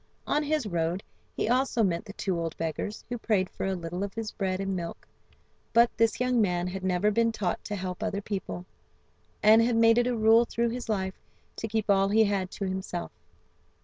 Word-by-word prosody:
On 295 Hz, -, +1 dB
his 300 Hz, -3 st, 0 dB
road, 175 Hz, 0 st, -1 dB, 0.3 s
he -, -, -1 dB
also 250 Hz, -1 st, +2 dB
met 170 Hz, -4 st, 0 dB
the 200 Hz, -, -9 dB
two 190 Hz, -4 st, -2 dB
old 165 Hz, -1 st, -3 dB
beggars, 165 Hz, +6 st, -4 dB
who 245 Hz, 0 st, -4 dB
prayed 200 Hz, -5 st, +1 dB
for -, -, -3 dB
a 190 Hz, -, 0 dB
little 175 Hz, +2 st, -4 dB
of 200 Hz, +1 st, -5 dB
his 225 Hz, -2 st, -4 dB
bread 190 Hz, -3 st, -2 dB
and 195 Hz, -1 st, -2 dB
milk, 170 Hz, -2 st, -6 dB, 0.7 s
but 235 Hz, 0 st, +5 dB
this 230 Hz, -1 st, +2 dB
young 250 Hz, -1 st, +2 dB
man 180 Hz, -3 st, +1 dB
had 185 Hz, +1 st, -5 dB
never 185 Hz, +3 st, +2 dB
been 230 Hz, +2 st, +2 dB
taught 200 Hz, -5 st, -2 dB
to 210 Hz, -, -3 dB
help 185 Hz, 0 st, -5 dB
other 210 Hz, -2 st, -1 dB
people, 195 Hz, -3 st, -5 dB, 0.8 s
and 220 Hz, +2 st, +7 dB
had 235 Hz, 0 st, +2 dB
made 230 Hz, +1 st, +5 dB
it 240 Hz, -, +2 dB
a 245 Hz, -2 st, 0 dB
rule 225 Hz, +1 st, +6 dB
through 235 Hz, 0 st, -1 dB
his 240 Hz, 0 st, -5 dB
life 190 Hz, -3 st, -2 dB, 0.4 s
to 225 Hz, -, -3 dB
keep 220 Hz, -1 st, -1 dB
all 195 Hz, -1 st, +4 dB
he 220 Hz, +2 st, +5 dB
had 200 Hz, -3 st, 0 dB
to 200 Hz, -, -5 dB
himself. 185 Hz, -2 st, -4 dB
205 Hz, 210 wpm, -28 LUFS, 185-230 Hz, 0.8 s, and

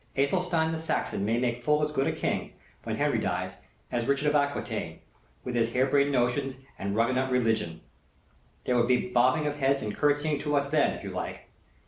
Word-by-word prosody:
Athelstane 160 Hz, +3 st, +1 dB
the 160 Hz, -, -3 dB
Saxon 160 Hz, -10 st, -1 dB
might 115 Hz, +2 st, +1 dB
make 120 Hz, -1 st, -1 dB
full 150 Hz, +3 st, +2 dB
as 150 Hz, -, 0 dB
good 135 Hz, -2 st, 0 dB
a -, -, +2 dB
King, -, -, -2 dB, 0.3 s
when -, -, -2 dB
Henry -, -, +1 dB
dies, -, -, -2 dB, 0.3 s
as 120 Hz, 0 st, -1 dB
Richard 140 Hz, +2 st, +2 dB
of -, -, -1 dB
Acquitaine, 145 Hz, -1 st, -1 dB, 0.5 s
with 125 Hz, -, -4 dB
his 115 Hz, -1 st, +1 dB
harebrained 140 Hz, +2 st, +3 dB
notions 130 Hz, +1 st, +1 dB, 0.2 s
and 100 Hz, +1 st, -2 dB
runagate 130 Hz, +4 st, +1 dB
religion. 110 Hz, -10 st, 0 dB, 0.8 s
There 125 Hz, -, +1 dB
would 120 Hz, 0 st, +3 dB
be 125 Hz, 0 st, +2 dB
bobbing 125 Hz, +5 st, +3 dB
of 145 Hz, 0 st, -2 dB
heads 135 Hz, -1 st, +1 dB
and 105 Hz, -1 st, -3 dB
curtseying 145 Hz, 0 st, +1 dB
to 145 Hz, 0 st, -1 dB
us 140 Hz, 0 st, 0 dB
then, 155 Hz, -2 st, +3 dB
if -, -, -11 dB
you -, -, -5 dB
like. -, -, -6 dB
135 Hz, 190 wpm, -28 LUFS, 120-145 Hz, 0.8 s, harebrained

